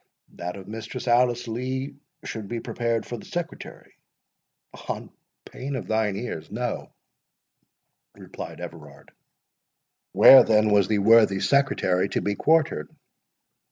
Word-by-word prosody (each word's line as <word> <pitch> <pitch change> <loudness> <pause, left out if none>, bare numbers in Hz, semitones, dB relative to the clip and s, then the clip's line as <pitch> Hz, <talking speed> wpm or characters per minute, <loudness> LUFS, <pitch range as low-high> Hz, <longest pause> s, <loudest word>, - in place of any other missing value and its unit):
"That 90 +1 -6
of 95 -1 -11
Mistress 110 +4 -7
Alice 120 0 +2
Lee 130 +4 -4 0.3
should 110 -3 -6
be 120 +3 -4
prepared 115 -1 -2
for 120 - -6
the - - -12
Secretary." 175 -1 -7 1.0
"On - - -5 0.3
pain 140 +2 -6
of 130 - -5
thine 110 -2 0
ears—No," 115 +2 -5 1.2
replied - - -9
Everard. 80 -5 -11 1.0
"Where 135 - +9
then 110 -1 +2
was 100 -2 +4
the 110 - +1
worthy 105 -1 +5
Secretary 100 -8 +1
to - - -2
be 105 - -1
quartered?" 155 - +1
110 Hz, 120 wpm, -24 LUFS, 100-125 Hz, 1.2 s, Where